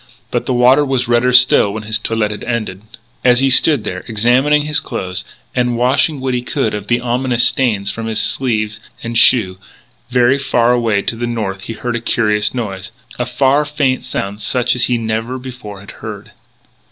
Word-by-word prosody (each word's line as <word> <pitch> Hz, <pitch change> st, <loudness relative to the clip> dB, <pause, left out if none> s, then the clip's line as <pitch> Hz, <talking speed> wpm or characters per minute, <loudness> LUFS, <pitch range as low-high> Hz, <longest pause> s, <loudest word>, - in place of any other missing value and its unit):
But -, -, -2 dB
the 130 Hz, -, 0 dB
water 125 Hz, +4 st, +5 dB
was 130 Hz, -3 st, -1 dB
redder 120 Hz, +1 st, +2 dB
still 125 Hz, -5 st, +5 dB
when 110 Hz, +1 st, -6 dB
his 110 Hz, +1 st, -1 dB
toilet 105 Hz, -2 st, -2 dB
ended. 110 Hz, -5 st, -4 dB, 0.4 s
As 125 Hz, 0 st, +4 dB
he 135 Hz, 0 st, +3 dB
stood 140 Hz, -1 st, +4 dB
there, 95 Hz, 0 st, -5 dB
examining 125 Hz, +7 st, +2 dB
his 150 Hz, +1 st, 0 dB
clothing, 90 Hz, 0 st, -4 dB, 0.3 s
and 125 Hz, -1 st, 0 dB
washing 130 Hz, +4 st, +2 dB
what 130 Hz, -1 st, -2 dB
he 125 Hz, -, -1 dB
could 125 Hz, -2 st, -2 dB
of 105 Hz, -1 st, -5 dB
the 120 Hz, +2 st, +1 dB
ominous 125 Hz, 0 st, 0 dB
stains 105 Hz, -6 st, +1 dB
from 115 Hz, 0 st, -5 dB
sleeve 110 Hz, -4 st, 0 dB, 0.2 s
and 115 Hz, 0 st, -5 dB
shoe, 105 Hz, -5 st, +4 dB, 0.5 s
very 125 Hz, +2 st, +3 dB
far 120 Hz, -3 st, +1 dB
away 115 Hz, -4 st, 0 dB
to -, -, -2 dB
the 120 Hz, +1 st, -3 dB
north 105 Hz, -5 st, -4 dB
he 115 Hz, -, -5 dB
heard 120 Hz, +2 st, -4 dB
a 120 Hz, -, -3 dB
curious 105 Hz, -3 st, +1 dB
noise 95 Hz, -6 st, -5 dB, 0.3 s
a 125 Hz, -, -1 dB
far, 135 Hz, +4 st, +2 dB
faint 145 Hz, -3 st, -1 dB
sound 100 Hz, +2 st, -4 dB
such 125 Hz, +4 st, +1 dB
as 125 Hz, -, +2 dB
he 125 Hz, -, 0 dB
never 115 Hz, +2 st, -3 dB
before 125 Hz, -6 st, -9 dB
had 100 Hz, -, -11 dB
heard. -, -, -9 dB
120 Hz, 185 wpm, -16 LUFS, 110-125 Hz, 0.5 s, water